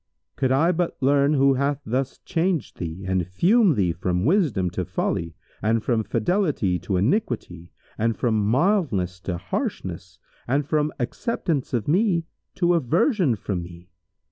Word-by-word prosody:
Could 130 Hz, -2 st, 0 dB
I 155 Hz, +7 st, +4 dB
but 175 Hz, -1 st, -1 dB
learn 140 Hz, +2 st, +3 dB
who 135 Hz, 0 st, +4 dB
hath 140 Hz, +1 st, 0 dB
thus 130 Hz, +4 st, -2 dB
changed 170 Hz, -4 st, -1 dB
thee 85 Hz, +2 st, -5 dB
and 95 Hz, -2 st, 0 dB
fumed 185 Hz, -, +3 dB
thee 95 Hz, -5 st, +2 dB
from 90 Hz, +2 st, -1 dB
wisdom 135 Hz, -, +2 dB
to 90 Hz, -, -2 dB
folly 85 Hz, 0 st, -2 dB, 0.3 s
and 110 Hz, +1 st, +1 dB
from 115 Hz, -3 st, +1 dB
fidelity 115 Hz, -, 0 dB
to 95 Hz, -, -2 dB
iniquity 100 Hz, -, -1 dB, 0.3 s
and 115 Hz, +1 st, +1 dB
from 120 Hz, -3 st, +1 dB, 0.2 s
mildness 125 Hz, -, +1 dB
to 90 Hz, -2 st, -2 dB
harshness 90 Hz, 0 st, -4 dB, 0.3 s
and 140 Hz, +3 st, +1 dB
from 150 Hz, -1 st, +1 dB
acceptation 140 Hz, -, -1 dB
of 110 Hz, -, -6 dB
me 175 Hz, 0 st, +2 dB, 0.3 s
to 175 Hz, -1 st, +2 dB
aversion 165 Hz, -, +2 dB
from 100 Hz, -3 st, -3 dB
me! 85 Hz, +1 st, -12 dB
125 Hz, 145 wpm, -24 LUFS, -, 0.3 s, I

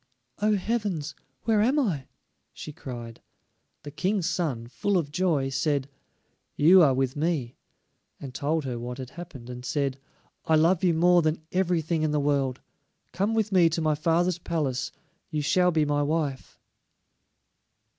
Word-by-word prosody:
"Oh, 210 Hz, +1 st, +3 dB
heavens, 195 Hz, -7 st, -2 dB, 0.3 s
where 220 Hz, -2 st, +3 dB
am 255 Hz, +7 st, +2 dB
I?" 180 Hz, -, 0 dB, 0.5 s
she 150 Hz, -, -8 dB
cried. 120 Hz, -4 st, -8 dB, 0.6 s
The 145 Hz, -, -8 dB
King's 185 Hz, +4 st, 0 dB
son, 135 Hz, -10 st, -2 dB
full 200 Hz, +10 st, 0 dB
of 150 Hz, -5 st, -2 dB
joy, 155 Hz, -5 st, +1 dB
said: 140 Hz, 0 st, 0 dB, 0.7 s
"You 180 Hz, +5 st, +7 dB
are 140 Hz, -5 st, +5 dB
with 130 Hz, 0 st, 0 dB
me," 145 Hz, -6 st, -1 dB, 0.6 s
and 135 Hz, -3 st, -8 dB
told 150 Hz, +3 st, -1 dB
her 125 Hz, -2 st, -3 dB
what 125 Hz, +1 st, -6 dB
had 130 Hz, -1 st, -7 dB
happened, 145 Hz, -7 st, -10 dB
and 125 Hz, 0 st, -8 dB
said, 135 Hz, 0 st, -1 dB, 0.5 s
"I 160 Hz, -, +3 dB
love 165 Hz, +4 st, +3 dB
you 175 Hz, -3 st, +3 dB
more 175 Hz, +1 st, +5 dB
than 155 Hz, 0 st, -1 dB
everything 170 Hz, -3 st, 0 dB
in 155 Hz, -, +1 dB
the 150 Hz, 0 st, +1 dB
world; 140 Hz, -3 st, 0 dB, 0.5 s
come 205 Hz, +4 st, 0 dB
with 215 Hz, -2 st, 0 dB
me 180 Hz, -3 st, +5 dB
to 165 Hz, -, -2 dB
my 155 Hz, -1 st, +2 dB
father's 170 Hz, +3 st, +1 dB
palace; 150 Hz, -7 st, -2 dB, 0.4 s
you 150 Hz, -2 st, -2 dB
shall 180 Hz, +4 st, +3 dB
be 155 Hz, -3 st, +2 dB
my 145 Hz, 0 st, +1 dB
wife." 145 Hz, -2 st, -2 dB
155 Hz, 155 wpm, -26 LUFS, 140-180 Hz, 0.7 s, You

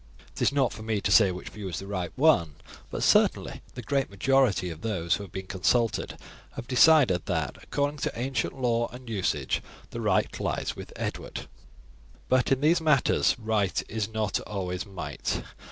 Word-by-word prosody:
It -, -, -8 dB
is -, -, +4 dB
not 140 Hz, -3 st, +1 dB
for -, -, -9 dB
me 110 Hz, -1 st, -1 dB
to 100 Hz, -, -1 dB
say 105 Hz, -2 st, +7 dB
which 90 Hz, -, -7 dB
view 100 Hz, -3 st, -7 dB
is 85 Hz, -, -4 dB
the 95 Hz, -, -6 dB
right 95 Hz, -3 st, -3 dB
one, 100 Hz, -, +3 dB, 0.3 s
but -, -, -3 dB
certainly -, -, +3 dB
the 125 Hz, -, -6 dB
great 140 Hz, +3 st, 0 dB
majority 100 Hz, -3 st, +2 dB
of 80 Hz, 0 st, -9 dB
those 90 Hz, -7 st, -1 dB
who 100 Hz, -, -1 dB
have 95 Hz, -, -11 dB
been 95 Hz, 0 st, -6 dB
consulted 110 Hz, +5 st, 0 dB, 0.4 s
have 115 Hz, -, -7 dB
decided 130 Hz, -, +5 dB
that, 80 Hz, -8 st, -2 dB
according 145 Hz, +1 st, -1 dB
to 120 Hz, -, -3 dB
ancient 135 Hz, +1 st, -2 dB
law 120 Hz, -2 st, +1 dB
and 125 Hz, +1 st, -11 dB
usage, 90 Hz, -11 st, -1 dB, 0.3 s
the -, -, -5 dB
right -, -, +1 dB
lies -, -, -2 dB
with -, -, -9 dB
Edward. -, -, -5 dB, 0.8 s
But 130 Hz, 0 st, +2 dB
in 135 Hz, 0 st, +2 dB
these 165 Hz, +3 st, +4 dB
matters 150 Hz, -5 st, +3 dB
'right 110 Hz, -4 st, 0 dB
is 110 Hz, -1 st, -3 dB
not 110 Hz, -2 st, -1 dB
always 95 Hz, -1 st, -4 dB
might.' 95 Hz, -3 st, -4 dB
110 Hz, 180 wpm, -27 LUFS, 95-130 Hz, 0.8 s, say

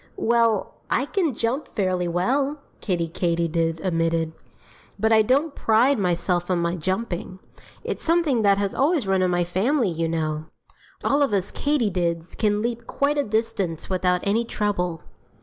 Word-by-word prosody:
"Well, 230 Hz, -3 st, +1 dB
I 260 Hz, -, +1 dB
can 325 Hz, -, 0 dB
jump 235 Hz, +7 st, -1 dB
fairly 185 Hz, -3 st, -1 dB
well," 265 Hz, -, 0 dB, 0.2 s
Kiddie 175 Hz, -4 st, -1 dB
Katydid 165 Hz, -1 st, -1 dB
admitted. 165 Hz, -2 st, 0 dB, 0.7 s
"But 220 Hz, +2 st, +1 dB
I 220 Hz, -, +6 dB
don't 275 Hz, +7 st, +2 dB
pride 235 Hz, +3 st, +3 dB
myself 175 Hz, -1 st, 0 dB
on 180 Hz, -, +2 dB
my 170 Hz, 0 st, 0 dB
jumping. 185 Hz, +2 st, -3 dB, 0.5 s
It's -, -, -4 dB
something 325 Hz, -8 st, +2 dB
that 200 Hz, -2 st, +4 dB
has 200 Hz, -1 st, -1 dB
always 290 Hz, -, +2 dB
run 190 Hz, -1 st, +2 dB
in 185 Hz, -, +2 dB
my 175 Hz, 0 st, +1 dB
family, 210 Hz, -, +1 dB
you 165 Hz, 0 st, -1 dB
know. 155 Hz, -1 st, -2 dB, 0.6 s
All 280 Hz, +1 st, +2 dB
of 275 Hz, -7 st, +2 dB
us 195 Hz, -1 st, 0 dB
Katydids 180 Hz, -, -1 dB
can 210 Hz, -1 st, +1 dB
leap 235 Hz, 0 st, -3 dB
quite 290 Hz, +1 st, 0 dB
a -, -, +2 dB
distance 205 Hz, -, -2 dB
without 180 Hz, -1 st, +1 dB
any 215 Hz, +4 st, +1 dB
trouble." 190 Hz, -7 st, -2 dB
195 Hz, 155 wpm, -24 LUFS, 175-235 Hz, 0.7 s, I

